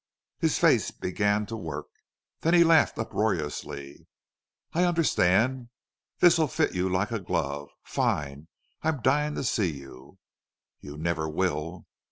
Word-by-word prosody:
His - - +1
face - - +3
began 100 +3 -1
to 115 - -6
work. 80 -8 -5 0.5
Then 165 +2 +2
he 170 - +7
laughed 165 -1 +4
uproariously. 75 -10 -3 0.7
"I 175 - +2
under 175 -2 +2
stand. 120 - +2 0.5
This'll 165 -3 +5
fit - - 0
you 90 +1 0
like 95 +4 0
a 115 - -1
glove.... 70 -6 -3
Fine! 70 +1 -2 0.3
I'm 155 -6 -1
dying 150 +3 +2
to - - -3
see 105 - 0
you." 70 +5 -13 0.6
"You 75 +1 -10
never 80 0 -1
will." 80 0 -2
95 Hz, 135 wpm, -27 LUFS, -, 0.7 s, he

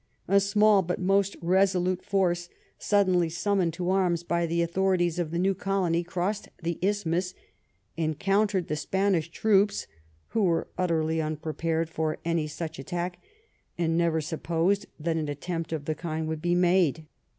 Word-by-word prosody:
A 200 +2 +5
small 200 0 +4
bnt 180 +1 -2
most 195 +1 +1
resolute 185 0 +2
force, 175 -3 0 0.3
sud 205 -1 +3
denlj 175 -3 +2
summoned 185 -2 +1
to 175 +2 -2
arms 180 -3 +1
by 170 0 0
the 170 +1 +1
authorities 175 -1 +1
of 170 -3 -1
the 170 - -3
new 190 +2 +2
colony 185 -3 0
crossed 180 +4 -3
the 170 0 -2
isthmus, 185 -2 0 0.6
encountered 195 +4 +1
the 150 - -1
Spanish 180 +1 0
troops, 200 +2 +2 0.4
who 225 - 0
were 170 -4 +1
utterly 160 -3 0
unprepared 160 +1 -2
for 160 -1 -2
any 165 -2 0
such 160 0 -6
at 135 - -8
tack 175 +1 -3 0.6
and 165 -1 +1
neyer 165 -2 +1
supposed 170 +4 0
that 165 +1 -1
an 155 -2 -2
attempt 165 +3 -4
of 155 -3 -3
the 155 - 0
kind 160 -1 -4
would 160 -1 -3
be 175 +1 +1
made. 175 -3 +2
175 Hz, 160 wpm, -27 LUFS, 165-190 Hz, 0.6 s, A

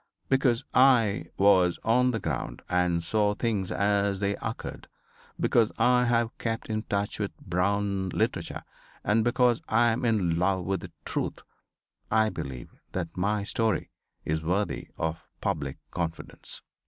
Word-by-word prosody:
Because 130 -3 +3
I 125 -6 +5
was 95 -3 +5
on 125 +3 +4
the 115 -3 -1
ground 80 -9 -4
and 90 -1 +1
saw 105 +4 +1
things 105 -5 -1
as 100 -1 +1
they 100 0 0
occurred; 110 - -6 0.5
because 115 -2 +3
I 125 0 +4
have 120 -1 +1
kept 115 -1 -3
in 110 0 0
touch 100 -1 -2
with 105 -2 -3
Brown 100 +1 0
literature; - - -2 0.4
and 110 +2 +3
because 120 0 +3
I 115 +2 +4
am 115 +2 -1
in 95 -8 +2
love 95 0 +1
with 95 0 0
the - - -9
Truth - - -3 0.7
I 110 0 +3
believe 65 -3 -6 0.2
that 85 -2 -3
my 100 +3 0
story 110 -2 0 0.3
is 80 +1 0
worthy 95 +6 -1
of 80 0 -2 0.2
public 70 -1 -2
confidence. 85 -2 -4
100 Hz, 140 wpm, -28 LUFS, 90-115 Hz, 0.7 s, I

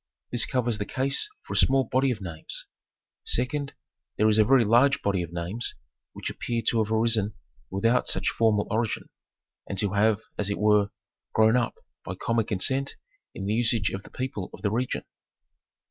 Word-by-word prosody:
This 120 - +2
covers 120 -4 0
the 105 - -1
case 135 - 0
for - - -7
a - - 0
small 135 0 +5
body 130 +3 +1
of 115 -5 -2
names. 85 -4 -5 0.6
Second, 140 +3 -1 0.4
there 110 - +4
is 110 0 +3
a - - +8
very 125 +1 +5
large 130 +6 +4
body 100 -3 +1
of 85 -1 -5
names 90 +8 -4 0.4
which - - -4
appear 115 -1 -3
to 115 -2 +2
have 110 - -6
arisen 110 -2 +2 0.3
without 115 +6 +2
such - - +1
formal 110 -3 +2
origin, 110 0 -1 0.6
and 100 - -3
to 100 0 0
have, 105 +1 +3 0.2
as 105 -1 +1
it 100 - -1
were, 105 -1 +4 0.5
grown 110 +1 +5
up 120 -2 +1 0.3
by 90 - -5
common 115 +3 0
consent 130 +8 0 0.4
in 95 - -5
the 105 - 0
usage 115 -3 +2
of 95 - -4
the - - -14
people 130 -8 -4
of - - -17
the 100 - +1
region. 125 +3 -1
110 Hz, 180 wpm, -27 LUFS, 100-125 Hz, 0.6 s, a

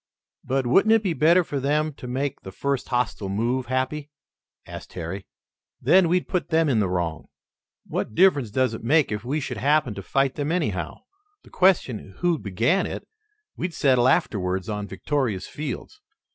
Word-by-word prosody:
"But 130 0 0
wouldn't 195 - +4
it 225 -1 +3
be 185 -4 0
better 170 +4 +4
for 145 -3 -3
them 150 +3 0
to 130 - -9
make 130 +2 -2
the 95 - -9
first 140 +2 -2
hostile 125 -5 -1
movement, 120 +5 -1
Happy?" 135 +3 -2 0.6
asked - - -10
Harry. 90 +2 -6 0.5
"Then 185 -2 +4
we'd 180 +1 +1
put 180 - -2
them 160 -1 +3
in 120 -5 +2
the 100 -3 +1
wrong." 85 -3 -2 0.6
"What 110 - -4
difference 145 - +4
does 130 +2 +1
it 110 - -7
make 145 +3 +3
if 105 0 -3
we 140 +6 -1
should 140 - -5
happen 145 -4 +2
to 100 - -7
fight 135 +6 +1
them, 145 +1 -2
anyhow? 105 - -2 0.4
The - - -18
question 130 - +1
who 175 -3 +1
began 115 - +1
it - - -7 0.5
we'd 175 -1 -4
settle 130 -3 +3
afterwards 95 - +1
on 105 -2 -3
victorious 105 +1 -2
fields. 155 - -6
130 Hz, 175 wpm, -24 LUFS, 105-155 Hz, 0.6 s, wouldn't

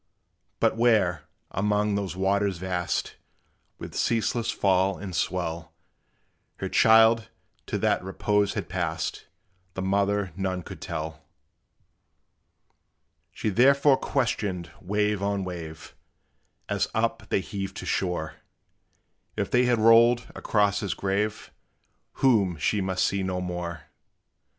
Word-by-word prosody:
But 115 -1 +2
where, 105 -9 +2 0.3
among 105 +1 +1
those 100 -2 -2
waters 100 0 +1
vast, 90 -1 -2 0.6
With - - -9
ceaseless 115 +1 0
fall 95 -3 +2
and 95 -3 -7
swell, 85 -2 -3 0.8
Her - - -4
child 110 0 +5 0.4
to - - -2
that - - +1
repose 100 +2 0
had - - -3
passed, 85 -3 -3 0.5
The 95 - -3
mother 100 -1 0
none 95 -1 -2
could - - -10
tell. 80 -1 -5 2.1
She - - -2
therefore 140 +6 +5
questioned 105 -11 -2
wave 105 +1 0
on 100 -1 -1
wave, 85 -4 -8 0.7
As - - 0
up - - -1
they - - +1
heaved 95 0 -6
to - - -6
shore, 90 -4 -2 1.0
If 100 -2 -2
they 125 +1 +4
had 120 -1 +3
rolled 115 +2 +5
across 100 -2 +1
his 100 - -3
grave, 100 +2 -2 0.6
Whom 100 -10 +2
she 100 +7 0
must 95 -1 0
see 100 0 0
no 95 -1 -2
more. 90 -2 -4
100 Hz, 115 wpm, -26 LUFS, 90-105 Hz, 2.1 s, child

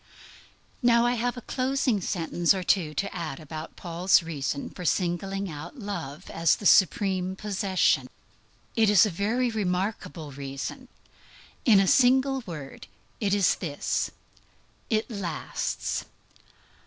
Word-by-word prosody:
Now 235 -1 +4
I 240 - +3
have 245 +1 -1
a 245 - -7
closing 255 -5 0
sentence 175 0 +1
or 185 - -3
two 165 -5 +1
to 200 - -2
add 160 -6 -4
about 155 0 -8
Paul's 175 +1 +2
reason 140 -3 -3
for 180 - -8
singling 190 +3 -1
out 160 - -8
love 180 - -6
as 165 0 +3
the 205 - -10
supreme 190 -1 +3
possession. 195 -2 +1 0.7
It 220 -2 +4
is 210 +1 +7
a 210 - -1
very 230 +7 0
remarkable 180 -6 -2
reason. 140 - -6 0.8
In 215 -5 +7
a 195 - +4
single 265 +5 +4
word 145 - -8 0.3
it 200 -2 +1
is 200 -3 +4
this: 150 -6 -2 0.8
_it 220 -1 +1
lasts. 190 -9 -3
190 Hz, 130 wpm, -27 LUFS, 165-220 Hz, 0.8 s, is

